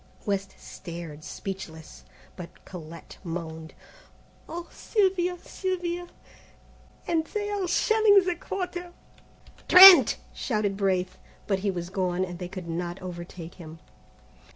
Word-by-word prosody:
West 195 -1 -2
stared 165 -3 -9
speechless, 165 -5 -8 0.3
but 175 -2 -11
Colette 165 -2 -11
moaned, 160 -2 -6 0.7
"Oh, 340 +1 -6
Sylvia! 370 -4 0
Sylvia! 355 -1 -4 1.0
and 325 -2 0
they 415 -1 -3
are 400 -3 -2
shelling 410 +1 +4
the 360 -1 0
Quarter!" 355 -1 -5 0.7
"Trent!" 365 -5 +10 0.2
shouted 210 -5 -1
Braith; 185 -2 -1 0.3
but 195 -2 0
he 200 +1 -1
was 175 -1 -4
gone, 185 -1 -1
and 175 -1 -9
they 180 - -5
could 185 -2 -8
not 175 +2 -4
overtake 175 -1 -9
them. 160 -1 -10
195 Hz, 115 wpm, -26 LUFS, -, 1.0 s, Trent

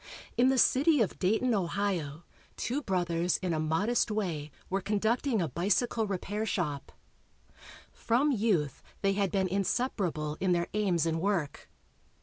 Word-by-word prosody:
In 250 +2 +4
the 265 - +2
city 285 +4 +4
of 215 - -1
Dayton, 220 +6 +2
Ohio, 175 -5 -1 0.3
two 265 +5 -2
brothers 175 - 0
in 180 -2 -2
a 155 - -1
modest 175 +12 +1
way 175 -9 -2 0.2
were 195 +1 -1
conducting 220 +2 0
a - - -1
bicycle 205 +7 0
repair 200 +2 -3
shop. 150 -10 -2 1.0
From 255 +6 +1
youth 200 - 0 0.2
they 195 0 +3
had 195 -2 0
been 190 -2 +1
inseparable 185 - -1
in 185 -1 +2
their 170 0 0
aims 190 -6 +1
and 165 0 -1
work. 175 -7 -2
195 Hz, 140 wpm, -30 LUFS, 170-220 Hz, 1.0 s, In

